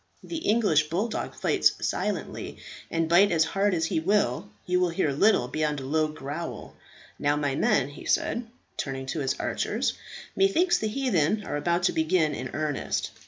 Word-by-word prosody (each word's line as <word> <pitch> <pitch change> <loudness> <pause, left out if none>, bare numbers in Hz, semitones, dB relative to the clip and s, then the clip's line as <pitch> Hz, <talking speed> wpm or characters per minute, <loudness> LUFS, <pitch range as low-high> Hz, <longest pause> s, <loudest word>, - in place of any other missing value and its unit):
The 335 - -5
English 205 - +2
bulldog 210 +7 -2
fights - - +3
silently, - - -3 0.3
and 165 -1 0
bite 180 +4 +5
as 160 -2 +4
hard 195 +4 +1
as 165 -1 0
he 160 - 0
will, 180 -2 +1 0.2
you 180 0 +1
will 180 -1 +2
hear 165 -3 0
little 140 - +3
beyond 150 +1 -1
a 135 - -7
low 155 +3 +1
growl. 150 +2 -6 0.4
Now, 145 0 +2
my 145 -2 0
men," 135 0 +2
he 145 - -11
said, 235 -1 0 0.3
turning 135 -1 -3
to 145 +4 -3
his 135 -2 0
archers, - - -1 0.4
"methinks 365 -2 +3
the 220 - -1
heathen 210 - +1
are - - -3
about 170 +4 0
to - - +3
begin 160 -1 +2
in 130 -2 -5
earnest. 155 -2 -2
165 Hz, 170 wpm, -27 LUFS, 145-205 Hz, 0.4 s, bite